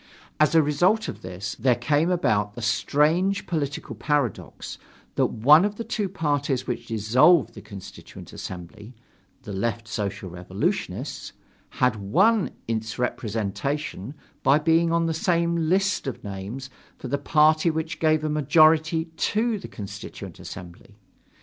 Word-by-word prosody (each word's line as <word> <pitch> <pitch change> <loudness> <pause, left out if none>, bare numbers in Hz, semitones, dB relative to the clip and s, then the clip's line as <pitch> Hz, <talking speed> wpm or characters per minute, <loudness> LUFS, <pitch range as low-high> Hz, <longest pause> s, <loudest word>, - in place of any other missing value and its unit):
As 155 +2 +4
a 160 - +6
result 180 +10 +2
of - - -6
this, 95 +3 -5
there 125 -2 +3
came 150 +5 +1
about 105 - +1
the 120 - -7
strange 160 - +2
political 145 -5 -3
paradox 145 - -2 0.3
that - - +2
one 145 +9 +5
of 205 0 -1
the 230 - -5
two 210 -3 -2
parties 145 -6 -1
which 120 -1 -4
dissolved 125 - +4
the - - -10
Constituent 100 -2 -11
Assembly 105 +7 -9 0.5
the 105 - -7
Left 115 +3 -2
Social 105 -3 -4
Revolutionists 90 +1 -3 0.4
had 125 -3 +1
won 190 - +2 0.2
its 110 0 -3
representation 115 +2 -3 0.3
by 135 +2 +5
being 165 +2 +2
on 170 0 +2
the 165 - 0
same 170 -1 +1
list 195 -3 +1
of 135 - -5
names 105 +7 -6 0.3
with 125 - -7
the 140 - 0
party 155 +2 +4
which 160 0 -3
gave 155 -1 +2
a - - 0
majority 155 +2 +4
to 220 0 0
the - - -8
Constituent 100 -2 -9
Assembly. 90 +5 -11
145 Hz, 140 wpm, -25 LUFS, 110-165 Hz, 0.5 s, a